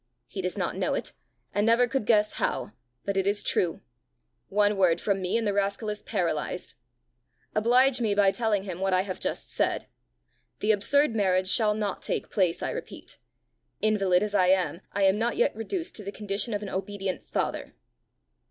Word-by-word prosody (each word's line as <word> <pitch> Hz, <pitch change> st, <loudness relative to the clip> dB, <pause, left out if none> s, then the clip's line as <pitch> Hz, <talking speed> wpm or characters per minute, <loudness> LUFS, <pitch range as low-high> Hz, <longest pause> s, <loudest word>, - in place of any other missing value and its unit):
He -, -, -6 dB
does -, -, -3 dB
not -, -, -1 dB
know -, -, 0 dB
it, -, -, -4 dB, 0.4 s
and 205 Hz, -, +1 dB
never 230 Hz, +2 st, +4 dB
could 245 Hz, -3 st, -2 dB
guess 210 Hz, -2 st, +4 dB
how; -, -, -1 dB, 0.3 s
but 200 Hz, -, -1 dB
it 195 Hz, 0 st, +1 dB
is 205 Hz, 0 st, +2 dB
true: 170 Hz, -3 st, 0 dB, 0.7 s
one 205 Hz, +1 st, +3 dB
word 180 Hz, -3 st, +3 dB
from 195 Hz, -2 st, 0 dB
me, 185 Hz, +4 st, 0 dB
and 230 Hz, -, -1 dB
the 205 Hz, -, +1 dB
rascal 200 Hz, +2 st, -1 dB
is 210 Hz, -, -6 dB
paralysed! 180 Hz, -3 st, -2 dB, 0.8 s
Oblige 245 Hz, +4 st, +4 dB
me 210 Hz, -3 st, +1 dB
by 200 Hz, -1 st, +4 dB
telling 215 Hz, -3 st, 0 dB
him 185 Hz, -3 st, -6 dB
what 190 Hz, -1 st, +1 dB
I 185 Hz, -, +3 dB
have 190 Hz, -1 st, -5 dB
just -, -, -3 dB
said. -, -, 0 dB, 0.7 s
The 215 Hz, -, +2 dB
absurd 255 Hz, +5 st, +3 dB
marriage 185 Hz, -3 st, +2 dB
shall 210 Hz, 0 st, +3 dB
not 210 Hz, -3 st, -3 dB
take -, -, -3 dB
place, 185 Hz, -5 st, +1 dB
I -, -, -1 dB
repeat. -, -, -8 dB, 0.6 s
Invalid 195 Hz, -4 st, +2 dB
as 210 Hz, -1 st, -3 dB
I 185 Hz, -3 st, +4 dB
am, 185 Hz, -1 st, +2 dB
I 200 Hz, -, 0 dB
am 195 Hz, +2 st, +4 dB
not 235 Hz, +2 st, 0 dB
yet -, -, +2 dB
reduced 330 Hz, -, -4 dB
to 215 Hz, -, -8 dB
the 200 Hz, -, -5 dB
condition 210 Hz, +2 st, -2 dB
of 205 Hz, -, -3 dB
an 200 Hz, -, -5 dB
obedient 195 Hz, 0 st, -4 dB
father." -, -, -2 dB
205 Hz, 190 wpm, -27 LUFS, 190-215 Hz, 0.8 s, never